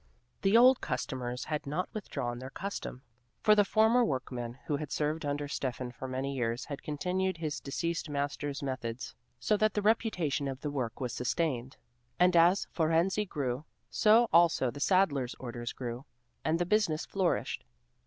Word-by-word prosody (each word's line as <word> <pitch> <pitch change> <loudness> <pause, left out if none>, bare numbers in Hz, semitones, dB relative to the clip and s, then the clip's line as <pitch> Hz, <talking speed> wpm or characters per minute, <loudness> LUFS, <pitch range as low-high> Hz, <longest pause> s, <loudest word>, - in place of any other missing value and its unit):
The 195 +3 +5
old 255 +2 +7
customers 125 -2 -3
had 150 -2 -3
not 155 +6 -1
withdrawn 120 - -4
their 130 +1 -7
custom, 170 -6 -6 0.4
for 215 - +7
the 210 -1 +5
former 220 +4 +4
workman 125 - -3
who 145 - 0
had 150 -1 -6
served 150 +2 -1
under 145 0 -2
Steffan 125 -3 -3
for 130 - -6
many 130 +2 -2
years 120 -2 -1
had 140 -2 -6
continued 180 +5 -1
his 155 -2 -3
deceased 165 +3 -3
master's 145 0 -3
methods, 120 -3 -4 0.3
so 125 - +2
that 215 0 +2
the 210 - +1
reputation 180 -10 +1
of 135 0 -5
the 150 - -3
work 125 -5 -3
was 125 -3 -3
sustained, 130 -1 -1 0.4
and 180 0 +5
as 175 +3 +5
Fohrensee 170 +5 +2
grew, 130 -2 -2 0.3
so 225 +2 +5
also 165 -7 +5
the 145 - -9
saddler's 145 -8 +2
orders 120 -1 -5
grew, 125 +1 -6 0.4
and 160 +1 +2
the 175 - 0
business 180 -5 +1
flourished. 135 - -1
145 Hz, 165 wpm, -31 LUFS, 130-180 Hz, 0.4 s, old